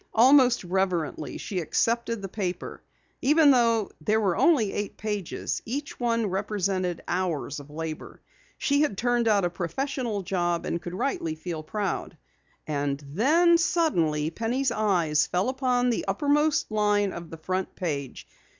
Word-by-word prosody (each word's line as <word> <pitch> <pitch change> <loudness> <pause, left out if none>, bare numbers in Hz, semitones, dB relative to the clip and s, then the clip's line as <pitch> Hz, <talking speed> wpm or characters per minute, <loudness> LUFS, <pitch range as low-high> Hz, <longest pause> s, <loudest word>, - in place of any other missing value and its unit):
Almost 250 0 +6
reverently 180 -3 -1
she 190 - -4
accepted 230 +5 0
the - - -3
paper. 185 -2 -4 0.4
Even 295 +2 +5
though 230 -4 +2
there 215 +8 +2
were 195 -5 +1
only 245 -12 +3
eight 205 -1 -4
pages, 210 -4 -3
each 275 +5 -5
one 230 -2 +1
represented 190 -2 -1
hours 170 -5 -2
of 145 0 -12
labor. 155 +1 -6 0.4
She 285 +1 +2
had 290 -11 0
turned 240 0 +1
out 205 -4 +3
a - - +1
professional 210 - -3
job, 175 -2 -1
and 170 - -2
could 175 +1 -6
rightly 190 - -2
feel 160 0 -5
proud. 200 +4 -3 0.5
And 145 -2 -2
then 325 - +4
suddenly 165 - +1
Penny's 240 +7 -1
eyes 180 -9 +2
fell 185 +7 0
upon 250 -2 +1
the 230 - -2
uppermost 295 -2 +1
line 205 -2 +2
of 170 -1 -8
the 165 - -8
front 185 +4 -3
page. 140 -7 -4
205 Hz, 145 wpm, -26 LUFS, 175-245 Hz, 0.5 s, Almost